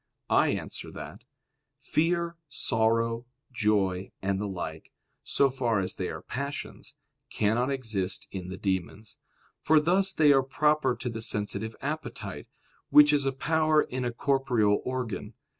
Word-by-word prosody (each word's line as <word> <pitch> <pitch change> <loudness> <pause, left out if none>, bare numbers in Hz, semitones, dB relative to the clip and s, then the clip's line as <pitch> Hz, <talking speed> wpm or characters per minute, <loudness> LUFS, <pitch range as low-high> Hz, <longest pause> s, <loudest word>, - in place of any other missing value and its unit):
I - - +5
answer - - -4
that, - - -9 0.5
Fear, 170 +1 0
sorrow, 115 -1 0 0.2
joy, 100 -5 +1
and 95 0 -1
the 105 - -2
like, 85 -5 -6 0.3
so 140 -1 +2
far 120 -5 0
as 95 - -1
they - - -3
are - - -7
passions, 140 +2 -6 0.3
cannot 115 +5 +1
exist 110 -9 -2
in 90 -2 -6
the 95 - -6
demons; 95 +3 -3 0.4
for 155 0 +4
thus 185 +5 +2
they 155 -5 +5
are 135 - +5
proper 150 0 +1
to 120 - -6
the 115 -1 -5
sensitive 105 0 -1
appetite, - - -5 0.4
which 150 0 +7
is 140 -2 +2
a - - +2
power 155 +2 +2
in 130 0 -4
a 120 - -1
corporeal 120 -5 +1
organ. 125 -4 -4
120 Hz, 140 wpm, -28 LUFS, 105-140 Hz, 0.5 s, which